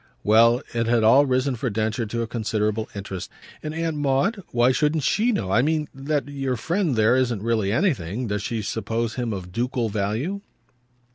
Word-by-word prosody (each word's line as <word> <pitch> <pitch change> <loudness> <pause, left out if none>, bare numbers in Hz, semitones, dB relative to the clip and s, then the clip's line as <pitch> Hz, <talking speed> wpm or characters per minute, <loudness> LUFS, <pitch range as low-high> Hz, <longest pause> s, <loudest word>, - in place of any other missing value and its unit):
Well, 115 +4 +5
it 115 -1 0
had 115 -1 +3
all 135 +6 +6
risen 130 +1 +1
for 125 +2 -2
Densher 110 +2 -1
to 115 +2 -2
a - - -4
considerable 110 -1 -1
interest. 100 -2 -6 0.3
"And 155 - -4
Aunt 165 -1 -2
Maud 145 +10 +1
why 120 +1 +3
shouldn't 150 +2 +1
SHE 225 - +2
know? 95 - -2
I 120 - +4
mean 155 +1 0
that 140 +2 -2
your 135 -2 -2
friend 165 - 0
there 110 +2 +4
isn't 120 -5 0
really 110 -4 +1
anything. 120 - 0
Does 105 -2 -2
she 110 +1 -3
suppose 115 +1 -2
him 120 -3 -2
of 90 -3 -6
ducal 120 +2 -1
value?" 110 - -2
120 Hz, 185 wpm, -24 LUFS, 110-140 Hz, 0.3 s, all